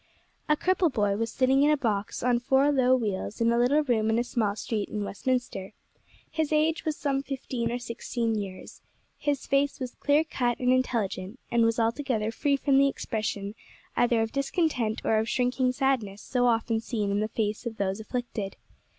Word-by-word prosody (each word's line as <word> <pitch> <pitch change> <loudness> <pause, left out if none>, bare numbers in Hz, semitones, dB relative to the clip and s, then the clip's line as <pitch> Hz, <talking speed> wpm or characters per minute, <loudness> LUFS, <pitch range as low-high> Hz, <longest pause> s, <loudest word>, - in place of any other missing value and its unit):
A 300 - +4
CRIPPLE 370 0 +2
boy 205 -6 +1
was 225 +2 -2
sitting 265 +1 +3
in 290 - +5
a 300 - +4
box 210 -6 -2
on 245 -1 +3
four 265 +4 +3
low 260 -2 +4
wheels, 210 -4 -3
in 230 0 +3
a 235 - +2
little 280 +5 +3
room 225 -5 +1
in 225 - +2
a 240 - +2
small 220 -4 -1
street 215 -1 -3
in 210 -1 -3
Westminster; 210 -2 -2 0.6
his 315 -1 -1
age 310 +2 +2
was 310 -2 -1
some 275 -2 0
fifteen 255 -4 -3
or 240 - -1
sixteen 235 -1 -3
years; 195 -3 -6 0.4
his 290 -2 -1
face 280 0 +1
was 255 -2 -4
clear 290 +2 +2
cut 245 -6 -1
and 250 0 +2
intelligent, 225 -4 -1
and 235 -1 +4
was 230 +1 +1
altogether 230 -1 0
free 280 +5 +1
from 275 0 +3
the 275 - +5
expression 215 -6 -3 0.4
either 235 -2 +3
of 225 - -4
discontent 275 - 0
or 220 - +3
of 220 +1 -1
shrinking 250 0 +1
sadness 250 -7 -1
so 245 -2 +1
often 225 -1 +1
seen 215 -3 -2
in 200 - +1
the 215 - 0
face 215 +1 -2
of 225 -2 -6
those 195 +1 -1
afflicted. 220 -3 -4
240 Hz, 190 wpm, -27 LUFS, 220-270 Hz, 0.6 s, in